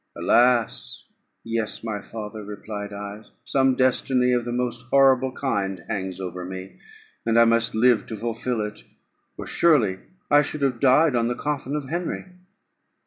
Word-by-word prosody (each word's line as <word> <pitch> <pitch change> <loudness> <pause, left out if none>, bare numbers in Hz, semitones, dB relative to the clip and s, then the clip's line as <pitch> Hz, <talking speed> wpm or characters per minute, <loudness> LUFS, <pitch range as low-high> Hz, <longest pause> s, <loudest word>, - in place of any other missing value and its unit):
"Alas! 120 -1 +2 0.4
yes, 115 -1 -3
my 105 -3 -3
father," 110 0 -7
replied 105 0 -7
I; 100 +1 -7 0.2
"some 135 -1 +2
destiny 130 0 +2
of 120 -1 0
the 120 - -3
most 120 -1 -3
horrible 135 -1 +4
kind 100 -8 -2
hangs 95 -1 -4
over 90 -1 -5
me, 95 +1 -8 0.4
and 115 0 +3
I 115 - +7
must 115 -1 +2
live 120 0 +3
to 110 - -6
fulfil 115 +1 -2
it, 105 0 -6 0.5
or - - -6
surely 115 - +3 0.3
I 145 0 +7
should 150 0 -4
have 130 -4 +1
died 140 +3 +4
on 115 -1 +2
the 120 - -1
coffin 145 0 -3
of 145 -3 -4
Henry." 175 +2 -3
115 Hz, 155 wpm, -24 LUFS, 105-130 Hz, 0.5 s, I